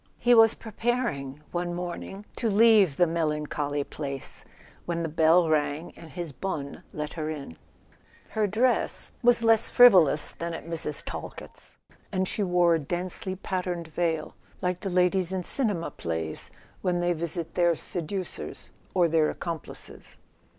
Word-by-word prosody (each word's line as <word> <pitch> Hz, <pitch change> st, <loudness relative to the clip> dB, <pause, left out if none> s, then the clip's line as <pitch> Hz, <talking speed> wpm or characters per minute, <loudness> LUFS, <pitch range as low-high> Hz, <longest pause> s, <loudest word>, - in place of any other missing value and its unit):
He 245 Hz, 0 st, +4 dB
was 225 Hz, -1 st, +7 dB
preparing, 220 Hz, -, -2 dB
one 175 Hz, 0 st, -2 dB
morning, 180 Hz, +3 st, -6 dB
to 230 Hz, -, 0 dB
leave 210 Hz, -7 st, +5 dB
the 175 Hz, -, +5 dB
melan¬ 155 Hz, -2 st, -1 dB
choly 145 Hz, -1 st, -2 dB
place, 140 Hz, -3 st, -5 dB, 0.4 s
when 170 Hz, -1 st, -1 dB
the 165 Hz, -, -2 dB
bell 165 Hz, +2 st, +4 dB
rang 150 Hz, +1 st, 0 dB
and 165 Hz, -, -12 dB
his 175 Hz, -1 st, -5 dB
bonne 140 Hz, -1 st, -5 dB
let 150 Hz, 0 st, -5 dB
her 155 Hz, -2 st, -3 dB
in. 140 Hz, -, -6 dB, 0.7 s
Her 215 Hz, -1 st, 0 dB
dress 235 Hz, +5 st, 0 dB
was 240 Hz, -1 st, +4 dB
less 225 Hz, -1 st, +4 dB
frivolous 185 Hz, -, +6 dB
than 170 Hz, 0 st, -5 dB
at -, -, -8 dB
Mrs. 160 Hz, -3 st, -2 dB
Talkett's, -, -, -8 dB, 0.3 s
and 185 Hz, 0 st, 0 dB
she 210 Hz, -, -1 dB
wore 180 Hz, -3 st, +3 dB
a 165 Hz, -, +2 dB
densely 180 Hz, +5 st, -3 dB
patterned 180 Hz, -3 st, -3 dB
veil, 160 Hz, -1 st, -1 dB, 0.3 s
like 180 Hz, 0 st, -1 dB
the 195 Hz, -, -4 dB
ladies 180 Hz, 0 st, +2 dB
in 190 Hz, -1 st, -2 dB
cinema 205 Hz, -7 st, 0 dB
plays 80 Hz, -2 st, -3 dB, 0.3 s
when 180 Hz, -1 st, 0 dB
they 175 Hz, 0 st, +1 dB
visit 165 Hz, 0 st, -4 dB
their 175 Hz, -1 st, +3 dB
seducers 180 Hz, +4 st, -4 dB, 0.2 s
or 175 Hz, -2 st, +4 dB
their 160 Hz, -1 st, +3 dB
accomplices. 165 Hz, -3 st, -7 dB
175 Hz, 150 wpm, -27 LUFS, 155-190 Hz, 0.7 s, was